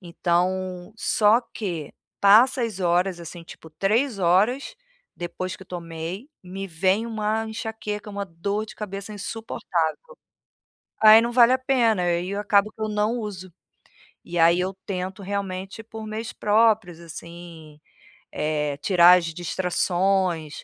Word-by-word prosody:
Então 180 +2 -2
só 215 0 +4
que 175 -10 -6 0.3
passa 235 +6 +5
as 215 -4 -3
horas, 175 0 +1
assim, 170 +1 -8
tipo 165 - -13
3 210 - 0
horas 205 - +2 0.4
depois 175 +1 -5
que 190 - -13
tomei, 175 - -7
me 190 +2 -6
vem 190 +5 0
uma 220 0 -2
enxaqueca, 215 -2 -5
uma 200 0 -4
dor 200 +5 -3
de - - -11
cabeça 200 0 -6
insuportável. 190 -6 -3 1.1
Aí 215 0 +9
não 235 +1 -1
vale 240 0 +6
a - - +3
pena, 235 -7 +2
aí 175 +1 0
eu 200 +1 -3
acabo 210 0 +2
que 220 - -14
eu 215 - -1
não 210 +3 0
uso. 190 -4 -7 0.7
E 175 0 -2
aí 170 +1 +5
eu 185 +1 -2
tento, 190 0 -5
realmente, 195 +1 -5
por 220 0 -9
meios 215 +1 -5
próprios, 210 -5 +2
assim, 170 -2 -11 0.5
eh, 150 -2 -2
tirar 180 +2 +6
as 175 - -2
distrações 175 0 -1
190 Hz, 135 wpm, -24 LUFS, 175-215 Hz, 1.1 s, Aí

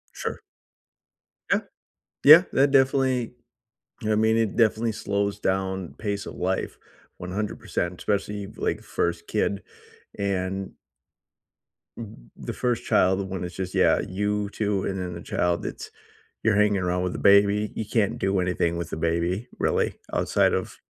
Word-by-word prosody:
Sure. - - -4 1.1
Yeah. - - +4 0.7
Yeah. 155 +5 +10
That 140 +1 +4
definitely 130 -3 +2 0.7
I 110 0 +1
mean, 110 +1 +3
it 115 -3 0
definitely 115 0 +2
slows 100 -1 -2
down 95 -2 -2
pace 100 -2 -3
of - - -8
life 95 +1 -2 0.4
100%, 90 -1 -3
especially, 100 0 -2
like, - - -3
1st 85 0 -2
kid. 100 -2 -1 0.6
And 95 -1 -2 1.2
m 105 - -10
the - - -6
1st 120 -2 -1
child, 95 +1 +3
the - - -1
one 95 -1 -5
that's 90 0 -5
just 95 -1 -4
yeah, - - +4
you 105 +2 -1
too, 105 -2 -1
and 95 -1 -2
then 90 -1 -4
the 85 - -7
child 85 +1 -1
it's - - -6 0.5
you're 110 -2 +3
hanging 105 -1 +3
around 90 0 0
with 90 - -2
the - - -5
baby. 100 +1 +4
You 110 - -4
can't 105 -1 0
do 95 0 +1
anything 85 -2 0
with 85 -1 -4
the - - -5
baby, 85 +6 -1
really, - - +1 0.2
outside - - +2
of - - -2
100 Hz, 150 wpm, -25 LUFS, 90-105 Hz, 1.2 s, Yeah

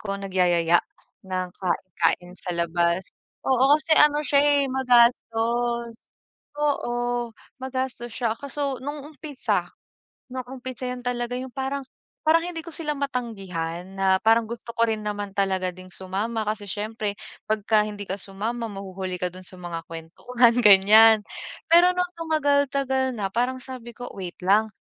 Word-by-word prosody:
ko 200 -2 -3
nagyayaya 175 -3 +2 0.5
ng 185 -1 -2
kain-kain 180 -1 -1
sa 180 - -5
labas. 170 +1 +1 0.4
Oo, 265 +2 +5
kasi 310 +1 -1
ano 295 0 +5
siya, 280 -1 +4
eh, 290 -1 +4
magastos. 235 -2 +2 0.7
Oo, 240 -4 -1 0.3
magastos 260 -2 -3
siya 235 -3 0
kaso 280 -1 -3
nung 290 +1 -5
umpisa. 295 -2 -2 0.6
Nung 255 -1 -5
umpisa 255 -1 -7
'yan 250 0 -5
talaga 245 0 -2
yung 255 0 -5
parang 270 +2 -2 0.5
parang 330 +1 +5
hindi 350 -2 -5
ko 335 - -10
sila 310 -2 -2
matanggihan 195 -10 -4
na 190 -1 +3
parang 225 +1 +4
gusto 235 0 -7
ko 230 - +3
rin 220 -1 -1
naman 205 -1 -4
talaga 190 -2 0
ding 185 0 -12
sumama 200 +5 -3
kasi 210 -1 -2
siyempre 210 0 -3 0.3
pagka 215 0 +2
hindi 205 -1 -6
ka 190 - -3
sumama 220 +5 -3
mahuhuli 190 -2 -5
ka 180 -1 -1
dun 185 +1 -11
sa - - -11
mga 170 -2 -5
kuwentuhan, 230 +9 +1
gan'yan. 210 +2 +8 0.5
Pero 350 +2 +7
nung 360 0 0
tumagal-tagal 280 -4 +1
na 200 -2 -2
parang 250 +3 0
sabi 250 -2 -8
ko, 245 0 -7
wait 180 -3 -7
lang 210 +3 +4
230 Hz, 145 wpm, -24 LUFS, 195-260 Hz, 0.7 s, gan'yan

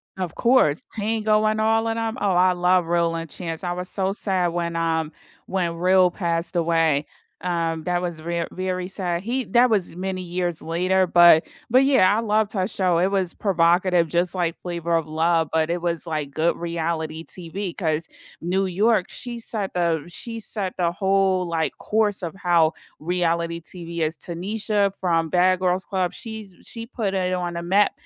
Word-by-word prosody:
Of 185 -3 -4
course, 235 - +3
Tango 215 0 +1
and 215 0 +1
all 225 +1 +2
of 225 - -1
them. 225 +1 -2
Oh, 200 -2 +1
I 180 +1 +4
love 180 -1 +2
Real 170 -1 +1
and 165 -1 -5
Chance, 165 0 -6
I 175 0 -1
was 180 +1 -5
so 190 -1 -1
sad 190 -4 0
when, 170 0 -2
um, 160 -1 0 0.3
when 175 -3 -1
Real 185 +1 +4
passed 170 -1 -2
away, 165 -3 +2 0.4
um, 165 -2 -1
that 175 +1 0
was 170 -3 -4
ver 170 +1 -2
very 185 -1 -3
sad. 180 -3 -2
He 250 +5 -1
that 245 +1 +4
was 195 -6 0
many 185 0 -3
years 175 -1 -2
later, 185 +3 +1
but 170 -2 +6 0.2
but 255 +3 +5
yeah, 210 -8 +5
I - - +1
loved 215 -1 +1
her 185 -3 0
show. 185 -4 0
It 185 +3 +2
was 190 -3 0
provocative, 175 -2 +2
just 175 +3 0
like 175 -3 -1
Flavor 170 -1 -2
of 165 -2 +1
Love, 160 0 +1
but 160 0 +2
it 175 +1 0
was, 170 -1 -2
like, 150 -3 -3
good 160 +3 +1
reality 165 -1 -3
TV 180 +1 -5
'cause 160 -2 -1 0.3
New 190 +3 0
York, 195 +2 +2
she 240 -1 -7
set 215 -4 -4
the 170 -3 +1
she 230 +6 -7
set 200 -3 -3
the 170 -2 +1
whole, 190 0 +1
like, 165 -1 -1
course 210 -3 0
of 165 - -3
how 170 -4 +3 0.3
reality 170 0 -1
TV 170 0 -6
is. 155 +1 -1
Tanisha 200 +3 -1
from 165 -3 +1
Bad 185 0 +3
Girls 180 0 0
Club, 185 -2 -1
she's 220 -5 -8
she 230 -1 -8
put 210 -6 -3
it 185 -1 0
on 175 -1 -2
the 170 - -4
map 195 +4 +3
180 Hz, 185 wpm, -23 LUFS, 170-195 Hz, 0.4 s, but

